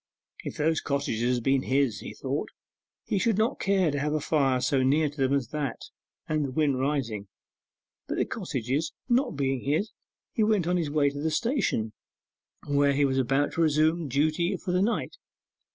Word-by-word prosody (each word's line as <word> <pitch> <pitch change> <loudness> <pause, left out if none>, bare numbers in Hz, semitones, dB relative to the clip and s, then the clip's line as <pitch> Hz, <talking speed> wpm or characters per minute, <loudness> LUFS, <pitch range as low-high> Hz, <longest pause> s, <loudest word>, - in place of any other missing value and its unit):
If - - -6
those 160 +1 +1
cottages 125 -4 0
had 120 - -3
been 135 +1 +3
his, 130 -6 +1
he - - -8
thought, - - -3 0.6
he 200 - 0
should 220 +1 +1
not 225 +5 +1
care 190 -5 +2
to 145 - -2
have 150 +1 -1
a - - +1
fire 135 -4 +2
so 130 +1 +1
near 145 +4 +3
them 135 -3 0
as 135 -4 0
that 150 -2 -3 0.5
and 155 -1 0
the 140 - -2
wind 140 -2 +1
rising. 130 -7 -1 0.8
But - - -3
the - - +2
cottages 135 +6 -2
not 250 - +2
being 135 -2 0
his, 160 +10 0 0.4
he 220 - +2
went 210 -5 +2
on 180 +1 +1
his 165 -4 -1
way 145 -1 +2
to 145 - -7
the 160 - 0
station, 155 - 0 0.7
where 140 0 +3
he 145 +1 +3
was 135 -1 +1
about 135 +3 +1
to 165 - 0
resume 155 +1 +2
duty 155 +7 +1
for 180 - -4
the 180 +1 +2
night. 235 - -1
145 Hz, 185 wpm, -27 LUFS, 135-165 Hz, 0.8 s, been